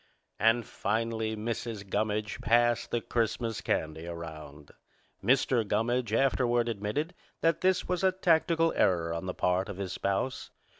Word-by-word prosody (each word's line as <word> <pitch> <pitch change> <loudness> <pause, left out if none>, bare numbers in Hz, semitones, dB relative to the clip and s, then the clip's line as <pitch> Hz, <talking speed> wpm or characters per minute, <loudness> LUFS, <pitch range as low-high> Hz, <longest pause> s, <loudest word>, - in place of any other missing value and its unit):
And 115 +1 +3
finally 110 +1 -1
Mrs. 110 -1 -4
Gummidge 105 +1 -1
passed 120 +1 +3
the 120 - -1
Christmas 115 -1 -1
candy 80 +1 -2
around. 80 -4 -8 0.5
Mr. 130 -2 +3
Gummidge 115 +3 0
afterward 120 -1 +2
admitted 115 - -2 0.3
that 165 0 +2
this 185 0 +2
was 180 0 -1
a 190 - +5
tactical 165 -2 +2
error 85 -3 +2
on 85 +3 -4
the 90 - -3
part 90 +2 +1
of 100 - -6
his 95 -2 -4
spouse. 100 +7 -2
110 Hz, 140 wpm, -29 LUFS, 100-125 Hz, 0.5 s, a